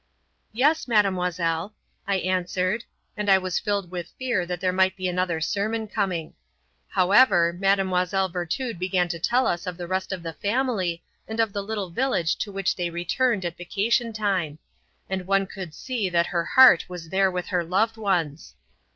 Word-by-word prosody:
"Yes, 295 +7 +2
Mademoiselle," 180 -4 0 0.3
I 200 - +1
answered, 185 +4 -1 0.3
and 210 -1 -2
I 195 - +7
was 185 -2 -1
filled 200 -4 -2
with 175 -2 -6
fear 240 -9 -1
that 180 -1 -3
there 185 0 0
might 190 0 +2
be 185 -1 -3
another 180 -2 -1
sermon 215 +6 -1
coming. 190 -7 -2 0.5
However, 185 -3 +4
Mlle. 190 0 +1
Virtud 180 +5 -3
began 180 -1 +1
to 170 -1 -4
tell 245 +9 +2
us 175 +2 -1
of 180 -1 -4
the 175 - -5
rest 190 +2 -2
of 185 -3 -4
the 165 -1 -5
family 200 - -1 0.2
and 220 +1 -5
of 225 -3 +1
the 200 - -2
little 200 -3 -4
village 175 -6 0
to 205 - -4
which 195 -1 -1
they 175 -1 -2
returned 190 +5 0
at 170 -1 -4
vacation 225 +6 0
time; 195 -8 -1 0.5
and 190 -1 -4
one 195 0 +2
could 185 -3 -8
see 240 -7 -2
that 170 -1 +2
her 170 -1 0
heart 260 +5 +7
was 175 -2 -8
there 190 +1 +3
with 180 -1 -4
her 180 -2 0
loved 205 +7 +1
ones. 175 -9 -2
190 Hz, 175 wpm, -25 LUFS, 175-210 Hz, 0.5 s, I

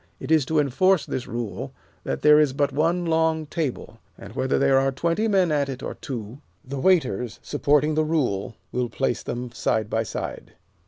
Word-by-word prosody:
It - - -6
is 155 -4 +4
to 160 +4 -1
enforce 155 +6 +3
this 130 - -4
rule 115 -3 -5 0.3
that - - -3
there 150 0 +7
is 150 -3 +3
but 140 0 0
one 165 +5 +1
long 160 -1 +1
table, 145 -7 -4 0.2
and 100 +2 -11
whether 130 - +1
there 135 -1 +4
are 135 0 +1
twenty 170 +10 0
men 190 -5 +3
at 145 -2 +1
it 130 0 -6
or - - -4
two, 120 -1 -7 0.3
the 135 +1 -5
waiters, 130 - +1
supporting 150 +1 +2
the 155 +1 +2
rule, 125 -11 -1 0.2
will 125 -1 -1
place 120 +1 -1
them 120 0 -5
side 110 -2 -1
by 110 - +1
side. 110 - -6
140 Hz, 190 wpm, -24 LUFS, 125-160 Hz, 0.3 s, there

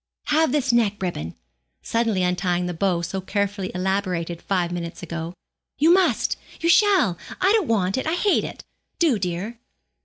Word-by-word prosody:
Have 315 -1 +3
this 275 -3 +1
neck 215 -3 +2
ribbon,' 85 - -4 0.5
suddenly 225 -5 0
untying 180 0 0
the 180 - -3
bow 175 0 0
so 190 +3 -3
carefully 200 0 -2
elaborated 180 -3 -1
five 180 -3 -1
minutes 170 -1 -5
ago. 170 +1 -5 0.4
'You 320 +4 +5
must, 375 0 +2 0.2
you 335 - 0
shall; 365 - +4 0.2
I 380 +2 +4
don't 425 -7 +2
want 195 -1 +1
it; 260 - -3
I 320 - +1
hate 400 +2 +2
it. - - -7 0.3
Do, 300 -11 +2
dear.' 190 +6 -4
195 Hz, 160 wpm, -23 LUFS, 180-260 Hz, 0.5 s, You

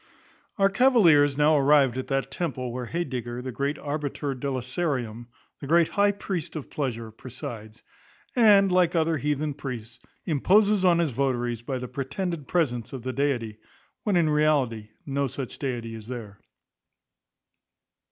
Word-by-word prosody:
Our 195 -1 +3
cavaliers 175 - +5
now 150 +1 +4
arrived 140 -3 +4
at 130 - -4
that 135 -1 -1
temple, 130 -8 -3
where 125 -1 -4
Heydegger, 125 -7 -4
the 130 - -4
great 140 +4 -2
Arbiter 145 -1 -3
Deliciarum, 130 -2 -3 0.3
the 140 - -7
great 165 +2 +4
high 205 0 +3
priest 190 -5 -5
of 155 - -6
pleasure, 115 -6 -3
presides; 115 -2 -9 0.5
and, 205 -5 +6
like 180 -1 +3
other 165 -1 +2
heathen 150 +1 -1
priests, 125 -4 -7 0.3
imposes 200 +6 +3
on 175 -2 +5
his 170 -4 +1
votaries 120 -2 -1
by 130 +2 -3
the 125 0 -5
pretended 145 +4 -4
presence 125 -10 -1
of 130 -3 -6
the 130 0 -3
deity, 120 -6 -1 0.4
when 205 -3 0
in 170 -2 +3
reality 140 -8 +1 0.2
no 140 0 -1
such 130 0 -6
deity 120 -4 -3
is 110 -1 -9
there. 115 -5 -7
140 Hz, 145 wpm, -26 LUFS, 125-165 Hz, 0.5 s, and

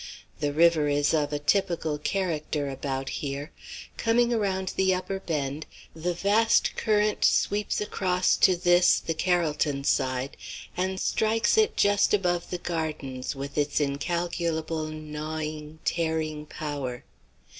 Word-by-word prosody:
The 145 -1 0
river 160 0 +4
is 145 +1 +2
of 150 -2 +1
a 145 - 0
typical 165 -1 0
character 155 -4 -1
about 135 0 -4
here. 140 +1 -4 0.5
Coming 235 +1 +2
around 190 -4 0
the 190 -1 +3
upper 190 +1 -4
bend, 150 -4 -3 0.3
the 170 +2 -2
vast 210 +5 +3
current 210 -1 +1
sweeps 205 +1 +2
across 185 -3 +1
to 185 - +5
this, 175 0 +4
the 165 - -3
Carrollton 155 -5 0
side, 130 0 0 0.4
and 190 +1 -1
strikes 220 +3 +2
it 440 0 +2
just 205 +1 +4
above 175 -3 -1
the 180 - -2
gardens 155 -7 -4
with 140 +1 -6
an 145 - +2
incalculable 160 +2 -1
gnawing, 155 0 -5
tearing 160 -2 -1
power. 140 -6 -5
160 Hz, 125 wpm, -27 LUFS, 150-185 Hz, 0.5 s, to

